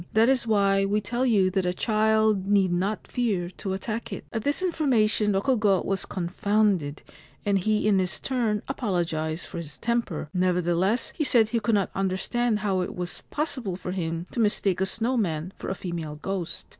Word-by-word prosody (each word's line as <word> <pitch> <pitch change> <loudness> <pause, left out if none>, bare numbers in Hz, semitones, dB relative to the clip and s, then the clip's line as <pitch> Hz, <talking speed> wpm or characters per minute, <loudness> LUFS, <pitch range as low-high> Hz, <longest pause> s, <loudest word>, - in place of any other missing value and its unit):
That 225 +3 +5
is 255 -3 +2
why 200 -2 +3
we 205 +2 +1
tell 240 +5 -1
you 195 -5 +3
that 190 0 +1
a 180 0 -1
child 215 -2 +2
need 200 -3 +3
not 195 +4 -1
fear 200 -8 -1
to 190 0 -4
attack 225 +4 -4
it.' 195 - -6
At 225 -2 -2
this 290 +6 +1
information 235 - +2
Rokugo 205 -2 +2
was 195 -1 -2
confounded, 190 -4 0 0.4
and 200 -1 +2
he 215 +2 +1
in 200 -2 +4
his 185 -1 -1
turn 230 -6 -1
apologised 170 - -2
for 170 - -6
his 150 -3 -6
temper; 235 -10 -1
nevertheless, 180 +4 +1
he 310 - 0
said 235 -6 +4
he 230 - +1
could 220 0 +1
not 200 -2 0
understand 210 +4 0
how 195 -3 +1
it 180 - -4
was 180 -1 -4
possible 260 - -2
for 180 0 -5
him 165 -2 -3
to - - -4
mistake 205 -4 +2
a 190 - +2
snow 235 +5 0
man 175 -3 -1
for - - -5
a 190 - -2
female 170 -5 -5
ghost. 175 +1 -4
200 Hz, 185 wpm, -26 LUFS, 180-225 Hz, 0.4 s, That